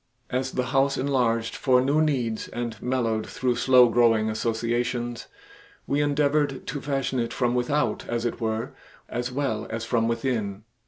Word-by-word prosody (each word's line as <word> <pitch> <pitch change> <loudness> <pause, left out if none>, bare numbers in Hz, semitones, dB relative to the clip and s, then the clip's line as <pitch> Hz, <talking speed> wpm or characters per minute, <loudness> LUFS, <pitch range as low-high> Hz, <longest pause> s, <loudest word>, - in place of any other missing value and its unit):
As 130 +1 -1
the 125 - 0
House 135 0 +3
enlarged 120 -4 0
for 130 -2 +3
new 140 +4 +2
needs 125 -8 0
and 120 -1 -4
mellowed 115 -4 -1
through 125 -1 -1
slow 125 0 +6
growing 115 -2 +3
associations, 120 +2 -2 0.6
we 145 +1 +1
endeavored 145 -1 +1
to 140 0 -4
fashion 135 -2 -1
it 115 - -1
from 120 -2 0
without, 135 +4 0
as 120 0 -1
it 120 - -3
were, 110 0 -2 0.4
as 120 +1 -3
well 125 -5 -2
as 115 0 -4
from 115 -1 +1
within. 115 -4 -2
120 Hz, 155 wpm, -25 LUFS, 115-135 Hz, 0.6 s, slow